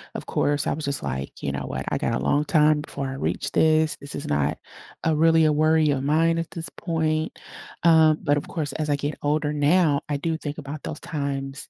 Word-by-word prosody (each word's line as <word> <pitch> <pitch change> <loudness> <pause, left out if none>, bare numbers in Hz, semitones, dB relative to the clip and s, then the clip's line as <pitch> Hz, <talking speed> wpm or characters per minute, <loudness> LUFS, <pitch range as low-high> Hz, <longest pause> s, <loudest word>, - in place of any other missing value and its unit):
of - - -5
course, 145 0 0
I - - +1
was 150 0 -4
just 140 -2 -2
like, 65 +2 -3
"You 70 - -2
know 70 - -4
what, 65 0 -4
I - - 0
got - - -1
a - - -1
long 145 - +1
time 150 -4 +3
before 140 -2 -5
I 130 - -4
reach - - -2
this, 155 0 +3
this 140 0 -7
is - - -5
not 75 -1 0 0.5
a 160 -1 +2
really 160 0 +4
a 150 - +3
worry 155 0 +3
of 135 -1 -1
mine 165 +3 +2
at 165 - -4
this 165 -1 -5
point." 160 -2 -1 0.5
Um, 160 -2 +6
but, 145 -2 +3
of - - -4
course, 155 -3 -3
as 155 -1 -3
I 145 - +3
get 145 +1 -3
older 150 0 0
now, 150 0 +3
I 145 - 0
do 160 +2 -2
think 145 -2 -6
about 145 +1 -7
those 150 - -5
times 140 -2 -4
150 Hz, 230 wpm, -24 LUFS, 140-160 Hz, 0.5 s, Um